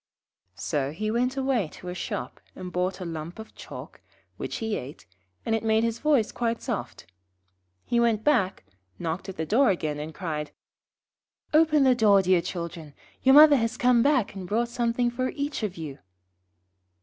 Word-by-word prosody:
So 140 - -2
he 215 +6 -2
went 250 +3 0
away 260 -8 +1
to 180 - -11
a - - -4
shop 125 -8 -5 0.2
and 180 -1 -7
bought 185 +1 -1
a - - -4
lump 165 0 -6
of 220 0 -10
chalk, - - -10 0.3
which - - -5
he 220 -2 -2
ate, 135 +4 -8 0.4
and 225 - 0
it 225 - 0
made 220 0 +2
his 230 0 -1
voice 290 -8 +2
quite 230 -1 -1
soft. 235 -6 -5 0.8
He 235 - +1
went 230 -2 +2
back, 195 - +1 0.3
knocked 170 - -4
at 190 - -8
the 160 - -2
door 245 - +4
again, 155 -6 -1
and 155 +2 -5
cried 155 -3 -4 1.0
'Open 305 -2 +5
the 260 -1 +5
door, 205 -5 +4
dear 185 -1 +3
children. 170 -4 -6 0.3
Your 265 +1 +6
mother 300 -1 +9
has 230 0 -1
come 245 -1 +4
back 270 -5 +2
and 190 -2 -7
brought 235 +4 0
something 240 0 0
for 255 +2 -1
each 285 -2 -3
of 205 -5 -3
you.' 150 -4 -7
220 Hz, 175 wpm, -26 LUFS, 175-245 Hz, 1.0 s, mother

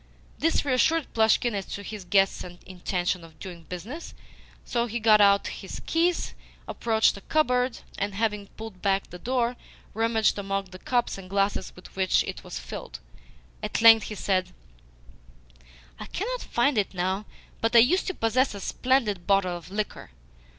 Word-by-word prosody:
This 325 -1 +2
reassured 290 +4 +2
Plushkin 225 +1 +3
as 195 -2 -3
to 205 - -6
his 205 -2 -7
guest's 195 +1 +2
intention 180 0 -3
of 160 -1 -15
doing 175 -3 -9
business, 220 - -7 0.5
so 240 0 0
he 235 +1 -3
got 215 -1 +6
out 200 0 +5
his - - -6
keys, 335 +1 +1 0.3
approached 220 -1 +2
a - - -10
cupboard, 250 -4 +1 0.2
and, 200 0 -2
having 210 -1 -1
pulled 220 -4 -9
back 195 -1 +1
the 180 - -8
door, 245 +2 0 0.4
rummaged 225 -1 +2
among 195 -1 -3
the 185 - -10
cups 240 -3 0
and 185 -1 -11
glasses 200 +1 0
with 180 - -14
which 190 -1 +3
it - - -6
was - - -6
filled. - - -7 0.6
At 210 +1 -2
length 225 -1 +9
he 215 - -5
said: 185 -2 0 1.5
"I - - -7
cannot - - -3
find 240 0 +1
it 200 -1 -2
now, 190 +3 -1 0.4
but 230 +1 +1
I - - +10
used 325 +11 +4
to 375 - -2
possess 230 +1 +1
a - - -6
splendid 215 -4 0
bottle 195 -3 +3
of 170 -1 -9
liquor. 205 - -4
210 Hz, 165 wpm, -26 LUFS, 190-240 Hz, 1.5 s, I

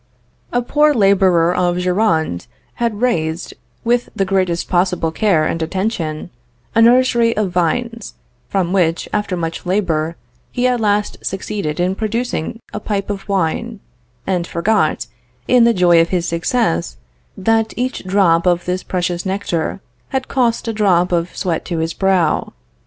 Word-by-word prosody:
A 245 0 0
poor 295 +4 +3
laborer 190 -5 +4
of 175 -1 +1
Gironde 180 - 0 0.3
had 230 -2 -1
raised, 165 -9 -1 0.3
with 240 +1 +1
the 195 - +1
greatest 185 -3 0
possible 180 -2 +1
care 170 -4 +2
and 165 - -2
attention, 170 -2 -3 0.4
a 230 - +4
nursery 235 -1 +4
of 205 -4 0
vines, 230 +6 -1 0.3
from 185 -2 0
which, 170 -3 +1
after 205 -3 -1
much 165 -1 -4
labor, 170 -4 0 0.4
he 250 0 -1
at 250 -1 +1
last 205 -1 0
succeeded 190 -4 -3
in 180 +1 +1
producing 225 -1 -3
a 210 - -3
pipe 205 -1 -2
of 200 0 -7
wine, 200 +4 -1 0.5
and 180 -2 -1
forgot, 170 -2 +1 0.4
in 245 -2 +5
the 235 - +5
joy 175 -5 +5
of 165 - 0
his 175 -2 -1
success, 165 - 0 0.4
that 225 +3 +1
each 255 +2 -2
drop 185 -3 +3
of 175 -1 +2
this 180 +1 -1
precious 175 -1 -2
nectar 190 -2 -2 0.3
had 265 -1 -2
cost 240 -3 0
a 225 - -1
drop 185 -4 +2
of 170 0 -1
sweat 175 -4 -1
to 175 - -3
his 160 0 -1
brow. 190 -5 +1
190 Hz, 150 wpm, -18 LUFS, 170-220 Hz, 0.5 s, in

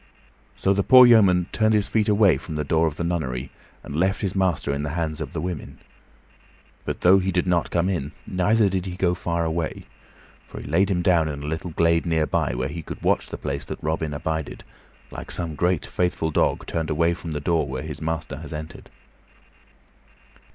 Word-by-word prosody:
So 95 - +2
the 100 - +1
poor 130 +4 +8
yeoman 100 -7 +5
turned 110 0 +2
his 105 -1 +1
feet 110 -1 +1
away 100 -7 +4
from 80 - -7
the 75 - -1
door 80 +3 +2
of 75 - -3
the 85 - -3
nunnery, 70 -7 -3 0.3
and 70 - -7
left 95 +5 +1
his 100 -3 -1
master 90 -7 0
in 70 - -2
the 75 - -3
hands 80 -2 -2
of - - -5
the 85 - -4
women. 85 -1 -5 1.1
But, - - -4
though 95 +2 +6
he 95 0 -1
did 90 0 0
not 90 -2 +1
come 85 +1 +1
in, 80 -7 -2
neither 105 +4 +2
did 95 -1 -2
he 90 - -5
go 90 -1 +1
far 85 -1 -2
away; 80 0 -3 0.6
for - - -9
he - - -9
laid 90 +7 +2
him 90 -3 0
down 85 -4 +3
in 70 -2 -5
a - - -5
little 80 +3 -4
glade 85 +1 +2
near 80 -2 +2
by, 60 - -1
where 65 +2 -1
he 80 +4 -6
could - - -9
watch - - +1
the - - -6
place 70 0 -4
that - - -6
Robin 80 0 -1
abided, 80 +1 -4 0.5
like - - -8
some 85 -3 -2
great, 90 +2 0
faithful 90 -2 -1
dog - - +1
turned 80 -2 -3
away 85 +2 +2
from 85 -1 -6
the 75 - -2
door 80 0 0
where 65 -1 -5
his - - -7
master 80 -3 -3
has 75 +1 -9
entered. 75 +1 -8
85 Hz, 210 wpm, -24 LUFS, 75-90 Hz, 1.1 s, poor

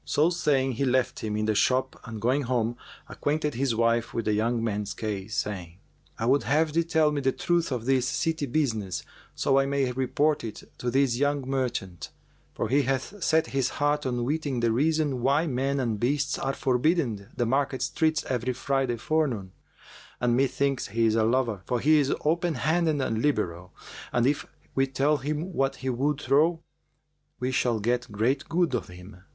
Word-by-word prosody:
So 155 +4 +2
saying, 140 -6 +1
he 125 - -2
left 130 -1 +1
him 105 -1 -3
in 105 - 0
the 110 - +2
shop 130 +5 +1
and 115 -2 -6
going 130 +6 +1
home, 120 -2 0 0.3
acquainted 150 0 -1
his 125 -1 0
wife 115 0 +1
with 115 - -1
the 105 - +2
young 115 +2 0
man's 105 -2 -2
case, 105 -1 -4
saying, 90 -5 -3 0.4
"I 115 - -2
would 135 +4 +4
have 155 +2 +1
thee 170 +1 +3
tell 160 -2 +2
me 145 -1 -1
the 135 0 +2
truth 170 +2 0
of 120 -3 -2
this 130 -1 +2
city 160 +1 -1
business, 115 - -1 0.3
so 135 0 +3
I 135 - +1
may 140 -2 0
report 145 +4 +1
it 110 -2 -7 0.2
to 125 - -1
this 130 -1 +2
young 145 -1 0
merchant, 120 - -3 0.5
for - - -1
he 135 +6 +3
hath 135 +9 -2
set 160 0 +3
his 135 -2 +1
heart 145 -1 +1
on 120 -1 -1
weeting 140 -2 -1
the 115 -1 +2
reason 145 +1 +1
why 140 +6 +2
men 135 -1 -1
and 115 -5 -1
beasts 140 +4 0
are 135 - -1
forbidden 130 - 0
the 120 - +1
market 130 +1 0
streets 155 +3 0
every 125 0 -1
Friday 135 -1 0
forenoon; 120 -8 -1 0.7
and 120 -1 +2
methinks 135 +1 +1
he 115 +3 +1
is 110 - +3
a 110 0 +2
lover, 115 -3 +1
for 125 - 0
he 155 +4 +4
is 140 -2 +1 0.2
openhanded 165 -1 +1
and 110 0 -1
liberal, 90 - -1 0.4
and 120 -1 +2
if 140 +2 0 0.3
we 135 0 +2
tell 140 +3 +1
him 150 +6 -3
what 135 -3 0
he 130 0 -3
would 140 +4 0
trow, 155 +4 +2 0.8
we 125 +1 -1
shall 120 -3 +1
get 120 +2 -1
great 120 +7 0
good 170 -3 +1
of 115 -7 -1
him." 90 +2 -12
130 Hz, 185 wpm, -27 LUFS, 115-145 Hz, 0.8 s, would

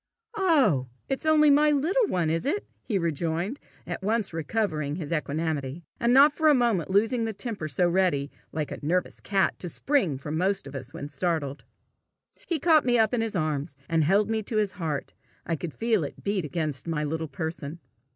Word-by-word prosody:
"Oh! 275 - +3 0.2
it's 270 +3 -1
only 305 -1 +6
my 300 +2 +5
little 335 - +2
one, 170 - 0
is 165 +9 -1
it?" 395 +8 -1 0.2
he 210 - -1
rejoined, 170 - -1 0.3
at - - -5
once 210 -1 0
recovering 155 -4 -1
his 160 -3 -6
equanimity, 155 -1 -2 0.2
and 235 - +2
not 280 +3 +7
for 315 0 +2
a 295 - +6
moment 230 - +1
losing 225 +4 +2
the 220 -2 -3
temper 210 -9 -3
so 165 +5 +1
ready, 170 -6 +1 0.2
like 150 -1 -4
nervous 175 +5 -1
cat, 195 -1 0
to 175 - -5
spring 190 - +1
from 150 +4 -4
most 195 +2 0
of 135 - -9
us 130 -1 -6
when 145 - -6
startled. 145 -1 -2 0.8
He 335 - 0
caught 310 0 +4
me 245 -1 +3
up 220 +1 +3
in 240 - +1
his 225 -2 -2
arms, 150 -3 -2
and 165 -1 +2
held 195 +6 +3
me 220 0 0
to 215 +1 -3
his 210 -2 +2
heart. 155 -6 -4 0.3
I 170 - 0
could 160 +1 -5
feel 225 -3 +1
it 145 - -7
beat 200 -4 0
against 155 -2 -3
my 155 -2 -1
little 160 +2 -2
person. 160 +1 -5
180 Hz, 190 wpm, -27 LUFS, 155-230 Hz, 0.8 s, not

